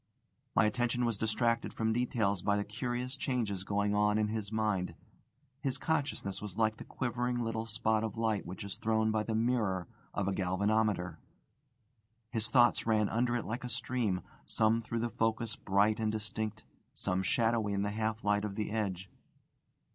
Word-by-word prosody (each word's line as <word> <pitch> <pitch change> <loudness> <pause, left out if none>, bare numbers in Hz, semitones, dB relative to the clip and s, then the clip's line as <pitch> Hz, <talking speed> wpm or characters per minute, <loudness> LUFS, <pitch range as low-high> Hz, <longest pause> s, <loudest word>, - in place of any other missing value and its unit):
My 115 - +6
attention 120 +2 +1
was 115 -4 -1
distracted 115 +1 +1
from 110 0 +1
details 110 -5 +1
by 100 +2 +2
the 100 - 0
curious 120 +4 -3
changes 115 -9 -1
going 100 +1 +1
on 105 0 +3
in 105 -1 +2
his 110 -2 -3
mind. 105 -4 0 0.7
His 135 -2 0
consciousness 145 -10 -1
was 105 -3 -7
like 110 -1 +2
the - - -7
quivering 125 0 -1
little 115 0 -2
spot 110 0 +1
of 110 -1 -3
light 110 -2 +1
which 90 +3 -7
is 100 -1 -6
thrown 110 0 +2
by 110 0 +1
the 110 +1 -2
mirror 110 -6 +1 0.3
of 100 -2 0
a 100 - +1
galvanometer. 95 -2 +1 1.1
His 110 -2 0
thoughts 120 0 +4
ran 110 -2 +3
under 120 +1 +1
it 120 - -1
like 120 +4 -3
a 125 - -4
stream, 115 -7 -1 0.3
some 110 +1 +3
through 115 0 -3
the 120 - 0
focus 115 -1 0
bright 100 +3 +2
and 110 -1 +1
distinct, 110 0 -4 0.3
some 90 +1 0
shadowy 110 +2 +2
in 100 0 +1
the 100 - -1
half 110 +1 -2
light 105 0 +2
of 105 -2 -3
the 105 -1 -2
edge. 100 -4 -2
110 Hz, 175 wpm, -33 LUFS, 100-115 Hz, 1.1 s, My